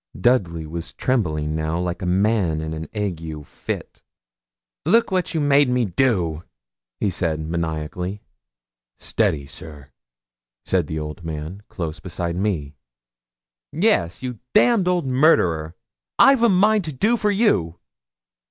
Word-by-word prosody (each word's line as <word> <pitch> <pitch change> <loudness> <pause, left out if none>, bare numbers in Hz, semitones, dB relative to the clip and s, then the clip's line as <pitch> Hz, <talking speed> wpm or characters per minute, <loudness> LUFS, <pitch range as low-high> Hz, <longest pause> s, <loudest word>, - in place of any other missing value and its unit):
Dudley 90 -8 +2
was 85 +2 -6
trembling 80 - 0
now 80 +1 -1
like 90 +2 -3
a 90 - -2
man 95 -3 +2
in 80 0 -4
an 80 0 -5
ague 80 -7 -4
fit. - - -6 0.8
'Look 230 -2 +3
what 185 -3 0
you - - +2
made 145 -2 +4
me 125 -1 +2
do!' 90 -6 +1 0.6
he 100 - +1
said, 85 -3 -1
maniacally. 85 +4 -3 0.7
'Steady, 70 -3 0
sir!' 70 0 -11 0.7
said 90 -5 +1
the 80 - -4
old 75 +2 -6
man, 80 +4 -6
close 85 -2 -5
beside 85 0 -4
me. 90 -7 -1 1.0
'Yes, 85 +7 +1
you 125 -4 -5 0.2
damned 210 -3 +4
old 180 -4 +1
murderer! 90 - +3 0.4
I've 270 -3 +6
a 235 - +5
mind 205 +1 +3
to 155 - -4
do 215 - +2
for 210 -2 0
you.' 195 - +2
90 Hz, 135 wpm, -22 LUFS, 80-130 Hz, 1.0 s, I've